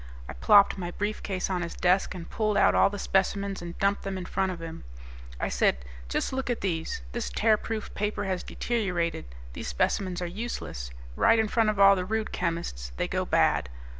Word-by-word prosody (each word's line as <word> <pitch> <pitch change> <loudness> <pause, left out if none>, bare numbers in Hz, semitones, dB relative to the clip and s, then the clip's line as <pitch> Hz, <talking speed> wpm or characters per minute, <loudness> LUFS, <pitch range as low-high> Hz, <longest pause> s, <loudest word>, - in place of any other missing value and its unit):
I - - -6
plopped 200 - +5
my 175 -1 -3
briefcase 200 -1 -2
on 185 -2 -1
his 170 -1 -4
desk 185 +1 +2
and 170 -2 -7
pulled 215 -2 0
out - - +5
all - - +5
the 205 - -6
specimens 195 0 0
and 175 0 -7
dumped 200 +1 +1
them 195 -1 -4
in 180 - -5
front 190 0 0
of 175 - -6
him. 165 -1 -7 0.6
I - - 0
said, 65 -1 +1 0.2
"Just 60 - -1
look 265 -1 -2
at 240 - -1
these. 165 - -2
This - - -3
'Tearproof 215 - 0
Paper' 210 0 -2
has 185 -2 -1
deteriorated. 180 - -2 0.3
These - - -6
specimens 180 - 0
are 180 - -2
useless. 175 - -5 0.3
Right 230 - +5
in 220 -1 +2
front 225 0 +2
of 210 -2 -1
all 195 0 +8
the 185 - -1
Rude 220 +3 -2
chemists, 165 - -3
they - - 0
go - - -1
bad. 75 -4 +2
190 Hz, 195 wpm, -28 LUFS, 170-205 Hz, 0.6 s, all